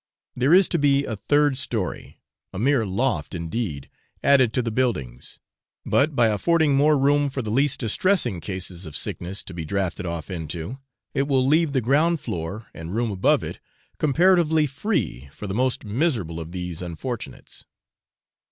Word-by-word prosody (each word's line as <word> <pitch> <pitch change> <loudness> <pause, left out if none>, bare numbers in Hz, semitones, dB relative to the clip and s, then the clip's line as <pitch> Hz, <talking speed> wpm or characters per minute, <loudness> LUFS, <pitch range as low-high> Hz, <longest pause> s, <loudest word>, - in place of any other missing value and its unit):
There 130 +4 +2
is 185 +1 +7
to 170 - 0
be 140 -1 +3
a 110 - -3
third 145 +5 +2
story 110 -7 -3 0.3
a - - -7
mere 120 0 +2
loft 95 - -1
indeed 85 - -3 0.4
added 130 -4 +5
to 125 - +1
the 115 - -2
buildings, 105 - -2 0.5
but 145 +1 +2
by 120 -3 +4
affording 155 +7 +2
more 150 +2 +4
room 145 +1 +3
for 130 -1 -4
the 105 - -4
least 135 +3 +1
distressing 120 - +1
cases 95 -2 -5
of 75 - -5
sickness 95 +4 -4
to 95 - -10
be 85 -1 -5
drafted 90 +1 -2
off 85 0 -5
into, 85 - -5 0.3
it 140 -1 0
will 130 -3 +2
leave 155 +1 +3
the 130 - +2
ground 155 +8 +2
floor 90 - -5
and 80 +4 -7
room 115 -1 0
above 95 -2 +2
it - - -6 0.4
comparatively 160 +1 +4
free 130 - -2
for 105 - -8
the 95 - -3
most 125 +2 0
miserable 105 - -1
of 80 0 -7
these 90 -2 -5
unfortunates. 95 +8 -6
120 Hz, 165 wpm, -24 LUFS, 90-140 Hz, 0.5 s, is